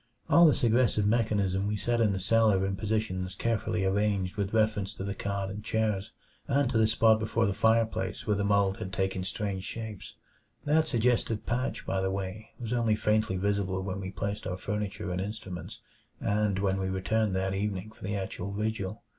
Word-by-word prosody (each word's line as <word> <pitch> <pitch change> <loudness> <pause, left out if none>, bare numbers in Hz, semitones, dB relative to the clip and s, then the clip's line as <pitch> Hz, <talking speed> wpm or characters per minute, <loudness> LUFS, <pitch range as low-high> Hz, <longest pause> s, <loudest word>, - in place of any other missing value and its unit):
All 170 +3 +8
this 150 - +2
aggressive 115 -2 +3
mechanism 105 -3 +1
we 105 - 0
set 120 +3 0
in 110 -3 +4
the 95 - -1
cellar 105 -1 +3
in 95 0 -1
positions 95 -3 -2
carefully 110 -3 0
arranged 100 -1 +1
with 100 -1 -2
reference 110 -3 +1
to - - -5
the 100 0 -2
cot 100 0 -3
and 105 +2 -7
chairs, 110 -3 -1 0.4
and 140 -1 +2
to 110 - +2
the 110 - +5
spot 110 0 +4
before 110 +1 +1
the 100 - +1
fireplace 110 -4 +1
where 105 - +2
the 100 - -1
mold 100 0 +2
had 105 -5 -5
taken 95 -1 -1
strange 95 0 -3
shapes. 110 -2 -7 0.5
That 155 +2 +3
suggestive 120 -4 +1
patch, 125 +3 -2
by 95 0 0
the 95 - 0
way, 95 +2 -4
was 120 -1 -3
only 115 -3 +2
faintly 105 -2 +1
visible 95 -1 0
when 95 0 -4
we 95 - -4
placed 100 +1 -4
our 90 -1 -3
furniture 100 0 -3
and 90 +1 -1
instruments, 95 -3 -6 0.4
and 105 -1 +1
when 95 -1 +1
we 95 0 -1
returned 95 +2 0
that 95 0 0
evening 100 +1 -2
for 110 - -16
the 100 +1 -2
actual 95 0 -4
vigil. 105 -1 -3
105 Hz, 190 wpm, -29 LUFS, 95-110 Hz, 0.5 s, All